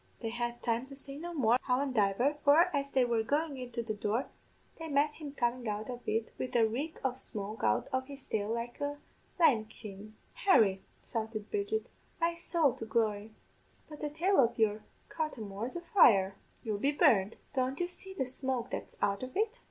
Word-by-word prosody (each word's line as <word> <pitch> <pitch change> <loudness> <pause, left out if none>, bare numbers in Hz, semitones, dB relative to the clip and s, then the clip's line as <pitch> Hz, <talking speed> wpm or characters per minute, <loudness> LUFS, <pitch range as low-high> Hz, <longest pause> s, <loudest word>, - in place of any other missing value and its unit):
They 225 - -3
had 240 0 -3
time 235 +2 0
to 275 - -10
say 275 0 -7
no 345 +2 -5
more, 250 -6 +3
howandiver, 250 -1 +2
for, 315 +4 +5
as 280 0 -1
they 260 -2 +3
were 235 -2 +1
goin' 290 +6 0
into 245 -2 -4
the 220 -1 -2
door, 215 +5 -1 0.5
they 325 - -5
met 290 0 +2
him 295 -3 -8
comin' 240 -1 0
out 210 +3 -3
of 245 0 -7
it 225 +1 -1
wid 255 - -4
a 230 -2 +6
reek 280 +9 -3
of 255 0 0
smoke 215 0 -5
out - - +2
of 260 0 0
his 280 -1 -8
tail 210 0 -2
like 235 +4 -4
a 285 0 -2 0.4
lime 250 -10 +5
kiln. 215 -1 -11 0.2
"'Harry,' 210 - +4 0.2
shouted 220 -2 -4
Bridget, 420 +2 -1 0.3
'my 335 0 +2
sowl 335 -5 +2
to 225 - -5
glory, 215 -1 0 0.5
but 300 - -10
the 300 - -1
tail 350 +7 +2
of 240 -2 +4
your 215 -1 +2 0.3
cothamore's 235 - -4
a 345 - -3
fire 200 - +5 0.3
you'll 215 -3 -2
be 280 +6 +2
burned. 210 -8 +4 0.2
Don't 260 0 0
you 350 - +1
see 380 +2 -7
the 265 - 0
smoke 260 -1 -3
that's - - -5
out 200 0 +1
of 255 +4 -5
it?' 445 +3 0
250 Hz, 190 wpm, -32 LUFS, 220-290 Hz, 0.5 s, a